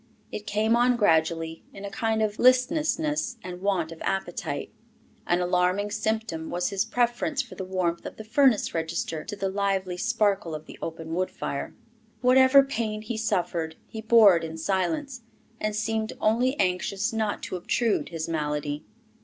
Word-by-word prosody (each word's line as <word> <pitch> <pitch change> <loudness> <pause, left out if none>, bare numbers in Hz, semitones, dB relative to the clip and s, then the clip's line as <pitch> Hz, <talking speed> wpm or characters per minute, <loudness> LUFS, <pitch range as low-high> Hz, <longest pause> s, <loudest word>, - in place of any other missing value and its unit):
It 210 0 -6
came 215 +2 +2
on 245 +1 +4
gradually, 165 -4 +1
in 200 0 -7
a 200 - -6
kind 220 -1 0
of 210 0 -2
listlessness 295 +1 +2
and 180 0 -7
want 185 -5 0
of 165 - -10
appetite. 175 -6 -3 0.6
An 175 +1 +2
alarming 180 +3 +1
symptom 215 -6 -2
was 180 0 -1
his 200 +1 0
preference 245 +5 0
for 245 - -12
the 190 - -5
warmth 185 -2 -1
of - - -10
a - - -5
furnace 250 +1 +3
register 160 -1 -2
to 205 - -6
the 195 -1 -2
lively 190 -2 -1
sparkle 205 -6 +1
of 155 0 -8
the - - -12
open 165 0 -5
wood 185 +2 0
fire. - - -5 0.5
Whatever 260 +2 +7
pain 220 -5 -3
he 225 +2 -4
suffered, 175 -7 -1
he 220 - -7
bore 220 -4 +7
it 165 - -1
in 160 0 -5
silence, 240 - -1 0.4
and 215 0 -1
seemed 220 0 -1
only 245 +6 +2
anxious 195 +4 0
not 220 -2 -1
to - - -4
obtrude 215 +5 0
his 165 -2 -4
malady. 150 -2 -2
205 Hz, 165 wpm, -26 LUFS, 175-230 Hz, 0.6 s, Whatever